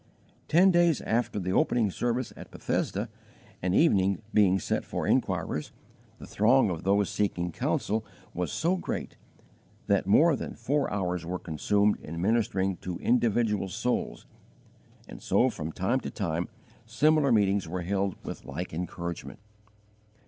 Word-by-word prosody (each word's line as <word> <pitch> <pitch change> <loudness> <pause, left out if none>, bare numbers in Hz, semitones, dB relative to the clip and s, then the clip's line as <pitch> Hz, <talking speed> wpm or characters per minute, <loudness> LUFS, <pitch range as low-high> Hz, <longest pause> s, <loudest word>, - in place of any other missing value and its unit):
Ten 185 +4 +5
days 170 -4 +3
after 115 -1 -1
the 95 0 -2
opening 110 -2 +2
service 120 +4 -2
at - - -11
Bethesda, - - -2 0.5
an 90 +1 0
evening 100 - +3
being 95 -3 +4
set 95 - -1
for - - -4
inquirers, 75 - 0 0.5
the - - -10
throng 115 0 +3
of 85 -2 -4
those 100 +1 +2
seeking 90 -4 -1
counsel 110 +6 -1 0.3
was 90 -3 -2
so 175 +4 +1
great - - -4 0.7
that 100 -2 +1
more 155 +10 +5
than - - -6
four 135 +5 -1
hours 90 -3 -2
were 90 +2 -3
consumed 100 +6 +1
in 85 +2 -7
ministering 95 -2 +1
to 90 -2 -5
individual 115 -4 +1
souls, 115 +6 -2 0.8
and - - -10
so - - +2
from 80 +2 -5
time 95 +10 0
to - - -6
time 85 -4 -2 0.4
similar 145 +4 +3
meetings 100 -4 +2
were 90 +2 -4
held 100 +1 -1
with - - -6
like 80 +6 -6
encouragement. 85 0 -5
100 Hz, 140 wpm, -28 LUFS, 90-120 Hz, 0.8 s, Ten